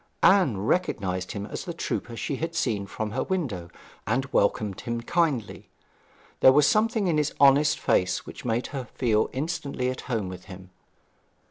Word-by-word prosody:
Anne 185 - +5
recognized 95 - -1
him 100 -1 -4
as - - -6
the 170 - -6
trooper 120 -7 -4
she 140 - -3
had 165 +3 -4
seen 105 -10 -1
from 110 +1 -4
her 130 +4 -1
window, 125 - -3 0.4
and 125 +5 +1
welcomed 100 -1 +1
him 120 0 -3
kindly. 145 -6 -1 0.7
There 130 - +8
was 145 +2 +5
something 220 - +2
in 165 -4 +2
his 150 -1 -1
honest 140 +1 +5
face 90 0 +1
which - - -10
made 120 0 -1
her 135 -3 -4
feel 110 -4 +2
instantly 140 -3 -2
at 130 - -6
home 110 -6 -1
with 90 0 -8
him. 95 -1 -11
125 Hz, 165 wpm, -26 LUFS, 105-150 Hz, 0.7 s, There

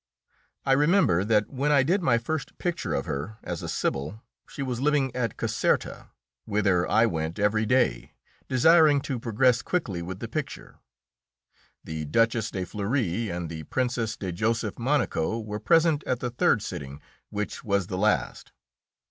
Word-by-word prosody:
I 135 - +2
remember 145 - +4
that 105 0 +1
when 140 +2 0
I 140 -2 +5
did 180 +8 +1
my 130 -8 +3
first 140 +5 -4
picture 175 -2 -2
of - - -2
her, 75 +11 -4
as 85 -2 -4
a - - -5
sibyl, 75 - -2 0.3
she 140 - -5
was 125 -2 -3
living 140 -3 +1
at 115 -4 -2
Caserta, - - -1 0.4
whither 100 -4 +1
I 110 +2 +4
went 80 -5 -2
every 105 +1 +1
day, 125 - +1 0.3
desiring 150 +2 +5
to 130 -2 -3
progress 120 +2 +2
quickly 110 - -2
with 90 +2 -6
the 115 - -6
picture. 140 +4 -6 1.0
The 80 -1 -5
Duchess 115 +7 +1
de 95 -2 -4
Fleury 105 +1 -1
and 85 -1 -4
the 80 0 -6
Princess 120 - -1
de 95 -2 -4
Joseph 110 +4 -1
Monaco 115 - 0
were 105 -1 -5
present 165 +5 +3
at 125 - 0
the 125 -1 -3
third 115 -3 +2
sitting, 70 -7 -6 0.3
which 105 0 -4
was 100 -3 +1
the 90 +1 -4
last. 105 +1 0
115 Hz, 160 wpm, -26 LUFS, 95-130 Hz, 1.0 s, I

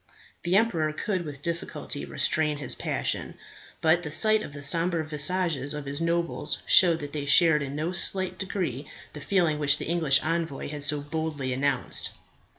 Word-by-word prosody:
The 175 +2 0
emperor 175 -8 +2
could 185 +1 -3
with 145 -2 -9
difficulty 170 - -4
restrain 150 - 0
his 140 -3 0
passion; - - -3 0.4
but 165 +2 +3
the 155 - -6
sight 215 +8 +4
of 145 - -7
the 145 0 -9
sombre 165 +2 +1
visages 155 -2 +1
of 150 -1 -6
his 140 +3 -4
nobles 170 0 -2
showed 170 -3 +5
that 145 -1 -7
they 145 -2 -4
shared 160 +1 +5
in 140 0 -5
no 155 +4 -2
slight 185 0 +2
degree 180 -8 -4 0.2
the 150 - -9
feelings 170 -4 +1
which 145 -2 +2
the - - -5
English 160 -5 +2
envoy 160 -4 -3
had 145 -1 -5
so 145 0 +1
boldly 145 -3 -3
announced. 135 -1 -2
155 Hz, 170 wpm, -26 LUFS, 145-170 Hz, 0.4 s, showed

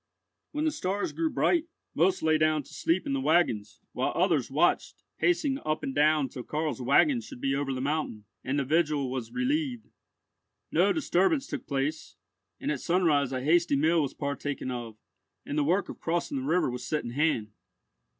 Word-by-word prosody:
When 300 +1 -1
the 315 - +2
stars 200 -6 -2
grew 325 -1 -1
bright, 335 +2 +2 0.3
most 185 +3 +2
lay 160 -1 +3
down 155 -1 +2
to - - -16
sleep 170 +3 0
in 135 - -1
the 135 - 0
waggons, 135 -9 +1
while - - -1
others - - +2
watched, - - +1 0.2
pacing 220 - +1
up 155 0 -1
and 135 - -3
down 150 0 +3
till 130 - -8
Karl's 150 +1 -3
waggon 130 0 +4
should 110 +2 -11
be 135 +1 0
over 140 0 -1
the 130 -1 -3
mountain, 140 -7 -2 0.2
and 135 +2 -1
the 140 - 0
vigil 150 -3 +1
was 125 -3 -4
relieved. 260 -2 -1 0.8
No - - +4
disturbance 270 - +2
took - - -6
place, 145 +3 -2 0.4
and - - -2
at 140 - -3
sunrise 160 -7 +2
a 130 -1 -3
hasty 170 +1 +3
meal 160 +4 +3
was 140 - -3
partaken 140 -2 -3
of, 120 -3 -6 0.5
and - - -4
the 150 - +2
work 180 +7 +1
of - - -9
crossing 165 -4 -1
the 130 - -4
river 165 -4 +2
was 125 0 -5
set 150 +3 -2
in 120 - -5
hand. 125 -6 0
150 Hz, 190 wpm, -28 LUFS, 135-175 Hz, 0.8 s, waggon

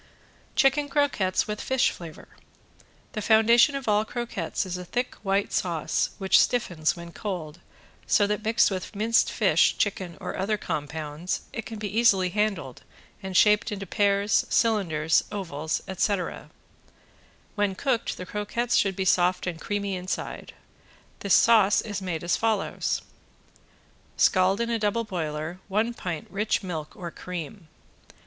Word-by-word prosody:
~CHICKEN 285 0 +3
CROQUETTES 275 -10 +1
WITH 210 0 -4
FISH 260 -1 +2
FLAVOR~ 165 -3 -10 0.8
The 215 - -4
foundation 230 +6 +5
of 275 -3 -5
all 210 0 +3
croquettes 220 -8 -3
is 185 -1 -4
a 180 - -5
thick 245 +8 -2
white 200 0 0
sauce 170 -4 0
which 190 -2 +4
stiffens 175 -10 +1
when 170 -1 -9
cold, 175 -6 -5 0.5
so 205 - +4
that 210 +1 -2
mixed 220 -1 +3
with 190 +2 -5
minced 225 +3 +2
fish, - - +3
chicken 185 -4 -2
or - - -5
other 210 +3 0
compounds 155 0 -4
it 225 - -5
can 225 - -7
be 210 +1 -2
easily 195 -6 +4
handled 195 - -2 0.4
and 190 -1 -2
shaped 210 +3 +4
into 200 -1 -4
pears, 200 +1 +2
cylinders, 165 -9 +2
ovals, 160 -6 -3
etc. 190 0 -2 1.0
When 205 -3 0
cooked 250 0 -1
the 180 - -6
croquettes 210 +5 -2
should 195 -2 +2
be 190 - -2
soft 180 0 +2
and 170 -3 -4
creamy 200 -1 -2
inside. 185 +1 -5 0.6
This 200 - +3
sauce 215 -4 +5
is 205 -3 -4
made 170 -4 -3
as 175 - +1
follows: 220 -3 -1 1.1
Scald 185 +1 +3
in 235 0 -1
a 230 - 0
double 210 +2 0
boiler 160 -3 -4
one 215 +4 0
pint 175 -8 -5
rich 210 +1 0
milk 160 -5 -5
or 175 -2 -7
cream. 180 +1 -7
200 Hz, 145 wpm, -26 LUFS, 180-220 Hz, 1.1 s, foundation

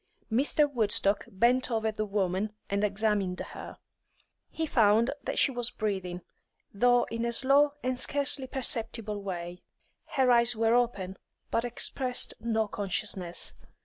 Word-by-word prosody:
Mr. 285 +5 +3
Woodstock 210 -6 +1
bent 240 +7 +2
over 220 -2 0
the 215 0 -3
woman 195 +1 -1 0.2
and 200 +1 0
examined 200 -3 0
her. - - -8 0.7
He 320 - -3
found 225 -3 +3
that - - -4
she - - +4
was 245 -2 +1
breathing, 190 -6 -3 0.5
though 245 +4 +4
in 230 0 -2
a 235 - 0
slow 275 +4 +4
and 255 0 -1
scarcely 280 -1 +1
perceptible 230 -5 -3
way; 175 -2 -6 0.5
her 260 -4 +3
eyes 235 0 +4
were 225 +1 +2
open, 200 -6 0 0.3
but 230 - +1
expressed 250 +1 0
no 225 -2 0
consciousness. 190 -3 -2
225 Hz, 135 wpm, -29 LUFS, 200-245 Hz, 0.7 s, she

